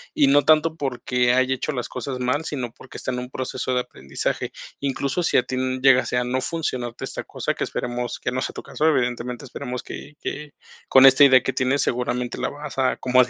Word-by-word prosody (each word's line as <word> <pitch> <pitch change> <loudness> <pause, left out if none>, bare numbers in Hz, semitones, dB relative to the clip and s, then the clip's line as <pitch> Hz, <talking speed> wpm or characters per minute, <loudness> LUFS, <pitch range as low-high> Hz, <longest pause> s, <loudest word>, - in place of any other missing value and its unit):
y 145 - +5
no 145 +1 +6
tanto 160 +1 +4
porque 125 -3 0
haya 130 0 +3
hecho 150 +4 -3
las 125 -3 -4
cosas 130 +1 -4
mal, 125 +5 0
sino 130 -7 -3
porque 130 - -12
está - - -3
en 125 - -3
un 125 0 -6
proceso 130 0 -3
de 125 - +2
aprendizaje. 70 - -4 0.3
Incluso 140 +3 -1
si - - +2
a 125 - +4
ti 130 - -4 0.2
llegase 130 -2 +4
a 125 - +2
no 125 +1 -1
funcionarte 130 -6 -3
esta - - -5
cosa, - - -3
que - - -3
esperemos 120 0 -3
que - - -2
no 130 +1 -2
sea - - -3
tu - - -7
caso, 155 - 0
evidentemente 125 -3 0
esperemos 125 0 -6
que 150 - -9
que 150 -1 -5 0.4
con 130 0 +8
esta 135 +1 +8
idea 130 -2 +7
que 135 - -1
tienes, 130 +2 +1
seguramente 125 0 -2
la - - -1
vas 145 -2 -7
a, 130 -1 +2
como 130 0 +4
se 125 - -6
130 Hz, 220 wpm, -23 LUFS, 125-140 Hz, 0.4 s, con